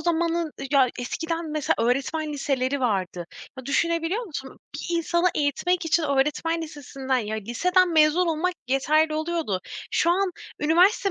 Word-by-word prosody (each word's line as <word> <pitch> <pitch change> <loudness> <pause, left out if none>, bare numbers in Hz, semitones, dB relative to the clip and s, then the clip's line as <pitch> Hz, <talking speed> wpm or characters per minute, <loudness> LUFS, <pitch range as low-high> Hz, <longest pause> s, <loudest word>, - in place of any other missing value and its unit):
zamanın 335 -1 0 0.2
ya 270 -3 +5
eskiden 325 +6 -3
mesela 305 -2 +1
öğretmen 275 +6 0
liseleri 275 -1 -1
vardı. 185 -7 -1 0.3
Ya 260 - -8
düşünebiliyor 335 - 0
musun? 275 -7 -8 0.2
Bir 345 -1 -2
insanı 340 +2 +1
eğitmek 320 +5 0
için 325 +1 +2
öğretmen 300 +4 0
lisesinden 270 -4 -3
ya, 220 -2 -3
liseden 350 - +2
mezun 315 +3 +4
olmak 335 +3 0
yeterli 305 +4 +2
oluyordu. 315 - -1 0.3
Şu 340 - +2
an 380 +1 +2 0.3
üniversite 360 +6 +4
310 Hz, 135 wpm, -25 LUFS, 270-340 Hz, 0.3 s, ya